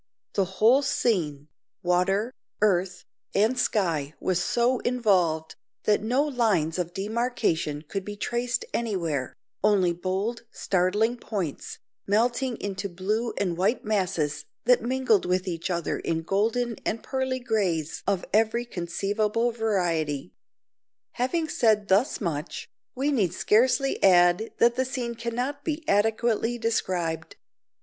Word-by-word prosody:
The 195 - +2
whole 240 +6 +5
scene 165 - 0 0.4
water, 195 +6 +1 0.3
earth, 185 -3 +1 0.3
and 220 +5 +3
sky 165 - 0
was 180 -2 0
so 245 +1 +2
involved, 185 -10 +1 0.3
that 210 - +2
no 250 +6 +2
lines 215 - +1
of 175 0 -3
demarcation 195 -8 -1
could 195 +5 -4
be 205 +1 -6
traced 240 +3 -2
anywhere; 170 - -2 0.3
only 195 -4 +3
bold 190 +7 -2
startling 205 +5 +1
points, 190 - -4 0.3
melting 240 +4 +1
into 200 0 -4
blue 210 +6 -2
and 180 -4 0
white 205 +8 0
masses 185 -8 0 0.2
that 250 -1 +5
mingled 240 -5 +1
with 185 +1 0
each 170 0 -3
other 170 -2 -1
in 165 0 -2
golden 225 +6 0
and 225 - -2
pearly 260 -1 -1
greys 195 - -1
of 195 -2 0
every 225 +3 +2
conceivable 210 +5 -1
variety. 175 - -1 0.8
Having 310 +6 -1
said 215 -6 +2
thus 200 +8 +3
much, 160 -5 -4 0.3
we 275 +3 0
need 195 - +1
scarcely 255 +7 +2
add 175 +3 +5
that 235 0 +4
the 260 - 0
scene 250 -2 -3
cannot 245 +5 -3
be 310 +1 -3
adequately 225 +3 +1
described. 180 -8 -2
210 Hz, 125 wpm, -26 LUFS, 180-240 Hz, 0.8 s, whole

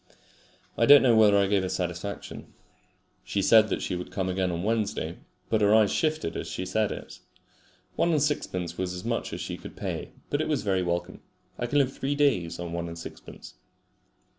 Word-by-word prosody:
I 115 - +4
don't 145 -1 +9
know 120 -3 +5
whether 105 -2 +6
I 100 - +4
gave 100 0 +2
her 95 - -2
satisfaction. 90 +3 -5 0.7
She 100 - -1
said 110 0 +6
that - - -2
she 90 - -2
would 90 - -6
come 95 -1 -2
again 95 0 0
on 85 +1 -3
Wednesday, 105 -6 -1 0.3
but 110 -1 +1
her 105 +1 +5
eyes 110 -2 +4
shifted 155 - -1
as - - -4
she 95 - -4
said 105 +3 0
it. - - -8 0.8
One 170 - +2
and 155 - +3
sixpence 90 - -2
was 90 -1 -2
as 90 - -8
much - - -2
as - - -5
she - - -5
could - - -11
pay, - - -5 0.2
but 145 - +1
it - - -1
was 150 -4 0
very 95 -3 +1
welcome. 85 0 -3 0.4
I 120 - -1
can 145 - 0
live 135 -2 +2
three 140 +2 -2
days 130 - +1
on 85 -1 -5
one 85 0 -3
and 85 0 -7
sixpence. 85 - -10
100 Hz, 205 wpm, -27 LUFS, 90-120 Hz, 0.8 s, don't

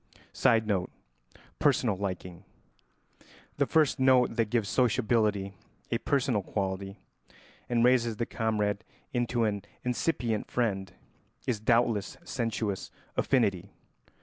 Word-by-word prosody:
[Sidenote: 110 -7 +2 0.7
Personal 110 -5 +3
liking.] 90 -3 -5 1.1
The - - +2
first 155 -4 +3
note 130 -2 +4
that 115 -2 +1
gives 115 -3 +1
sociability 110 -5 +1 0.4
a - - +1
personal 130 -6 +1
quality 95 0 -3 0.7
and 120 -1 +2
raises 120 -3 +3
the 115 - -1
comrade 105 -3 -1 0.3
into 120 -1 +1
an 105 -2 0 0.2
incipient 120 -3 -1
friend 95 -7 -1 0.5
is 115 -4 0
doubtless 115 -2 +1
sensuous 115 - -2 0.3
affinity. 100 -7 +1
110 Hz, 100 wpm, -29 LUFS, 100-120 Hz, 1.1 s, note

